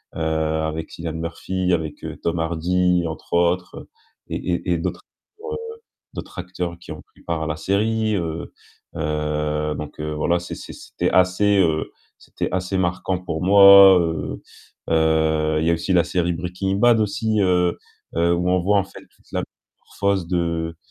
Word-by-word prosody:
heu, - - -5
avec 80 0 -1
Cillian 85 -1 -5
Murphy, 90 +3 -2
avec 80 -3 -3 0.2
Tom 85 0 -1
Hardy, 90 +2 +1
entre 80 - -8
autres 85 +1 0 0.4
et - - -3
et 90 0 -2
et - - +1
d'autres, - - -3 0.5
heu, - - -2 0.6
d'autres - - -8
acteurs 90 -1 -5
qui - - -12
ont 75 - -10
pris - - -25
part 85 -2 -3
à - - -4
la 80 - -2
série, 110 +5 0
heu 85 -1 -4 0.4
heu, 75 -1 -1
donc 75 0 -8
heu, 75 0 -3
voilà, 85 +3 +1
c'est 90 - -7
c'est - - -9
c'était - - -3
assez, 95 +2 +3
heu, 80 -3 +1 0.3
c'était - - -5
assez 90 +1 -1
marquant 90 0 -1
pour 85 -3 -5
moi, 100 -1 +9
heu 80 -2 -3 0.5
heu, 80 -1 +2
il 80 - -1
y 85 - +3
a - - +4
aussi 85 +3 -2
la 85 -2 +4
série 85 0 0
Breaking 90 +3 -3
Bad 120 +1 +4
aussi, 110 +1 0
heu 90 -2 +2 0.4
heu, 85 +1 +3
où 90 +1 -1
on 90 0 +2
voit 100 +3 +2
en 95 - +1
fait 95 - -13 0.2
toute - - -27
la - - -1
métamorphose 100 -3 -4
de, 85 -2 -1
85 Hz, 170 wpm, -22 LUFS, 80-95 Hz, 0.6 s, moi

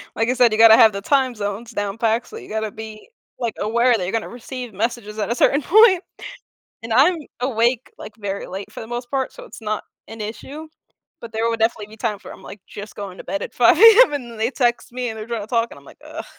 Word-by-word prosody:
like 225 +1 0
I - - +3
said, 245 -2 +4
you 215 - 0
gotta 225 -1 +9
have 220 -2 +6
the 200 - -5
time 260 +1 +1
zones 210 +3 -5
down 205 -2 -3
exactly, 230 - -1
so - - -12
you - - -14
gotta 220 -1 -3
be, 220 - -10 0.3
like, 235 -3 -2
aware 235 +3 +2
that 185 - -4
you're 180 - -3
gonna 225 -1 -2
receive 245 -1 -8
messages 215 +1 -3
at 215 - -2
a 235 - 0
certain 280 +3 +3
point, 385 +1 +5 0.8
and 225 0 -5
I'm 290 +10 +5 0.2
awake, 245 -1 0
like, 210 - -10
very 200 -1 -4
late 195 +2 -8
for - - -8
the 225 - -8
most 240 +1 -6
part, 270 -1 -2
so - - -12
it's 485 - -12
not 215 -1 -3 0.2
an 225 0 -10
issue, 270 +9 -7 0.5
but 230 -2 -10
there 225 +1 0
would 230 -1 -2
definitely 220 -2 0
be 215 - -14
times 210 -3 -3
where - - -9
I'm, - - -14
like, 205 - -11
just 205 +1 -10
going 195 -3 -7
to - - -9
bed 195 0 -3
at - - -7
5:00 245 +6 +5
AM 455 0 +8
and 260 -5 -4
then 230 - -11
they 225 +2 0
text 240 -3 -1
me 250 0 -3
and 220 -1 -6
they're 215 - -7
trying 235 -1 -3
to - - -8
talk 230 0 0
and - - -12
I'm - - -19
like, - - -16
"Ugh," - - -8
230 Hz, 260 wpm, -21 LUFS, 215-250 Hz, 0.8 s, gotta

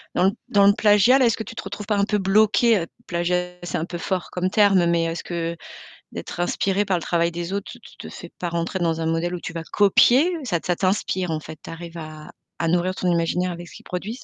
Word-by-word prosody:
dans 190 +2 +4 0.2
dans 200 -1 +5
le 205 - +6
plagiat 210 +5 +5
là? 260 - +4
Est-ce 230 - +2
que 220 - -4
tu - - -9
trouves 200 +1 -6
pas 210 -1 0
un 200 - +2
peu 210 0 0
bloqué, 210 0 +3 0.2
plagiat 180 +1 -1
c'est 175 - -3
un 160 - -2
peu 175 - -6
fort 185 +1 -3
comme 185 +1 -1
terme, 195 -4 +4
mais 170 -1 +2
est-ce 165 0 -3
que 170 -1 -3 0.6
d'être - - -7
inspiré 195 +3 0
par 190 -3 +1
le 165 - -5
travail 170 -1 +1
des 175 +2 -5
autres, 200 -1 -4
te - - -12
te 235 - -12
te - - -8
fais 175 - -10
pas 175 - -2
rentrer 170 +2 -2
dans 165 -1 0
un - - -1
modèle 165 +2 -1
où - - -6
tu 165 - -6
vas 165 -1 -5
copier? 250 - +5
Ça 190 -9 0
ça 175 - +1
t'inspire 185 -1 0
en 155 - -1
fait, 155 0 -10
tu - - -10
arrives 170 0 -8
à 155 -1 -9 0.3
à 165 - -1
nourrir 180 +2 +1
ton 180 -1 0
imaginaire 175 +2 0
avec 175 0 -8
ce - - -14
qu'ils - - -13
produisent? 210 +8 -5
180 Hz, 250 wpm, -23 LUFS, 170-200 Hz, 0.6 s, le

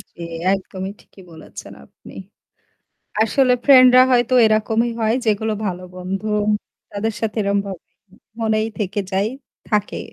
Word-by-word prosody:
জি, - - -18 0.3
একদমই 190 0 -4
ঠিকই 190 - -18
বলেছেন 160 - -11
আপনি। - - -17 1.1
আসলে 255 +2 +2
ফ্রেন্ডরা 255 -2 +8
হয়তো 245 0 +2
এরকমই 220 +2 +1
হয় 220 +1 +2
যেগুলো 220 0 0
ভালো 180 -1 -3
বন্ধু 190 +3 -5 0.6
তাদের 210 +2 -2
সাথে 225 0 -2
এরকমভাবে 200 -2 -2 0.6
মনেই 220 -1 0
থেকে 205 +1 -2
যাই 195 +2 +1 0.4
থাকে। 210 -2 -1
215 Hz, 120 wpm, -20 LUFS, 195-225 Hz, 1.1 s, ফ্রেন্ডরা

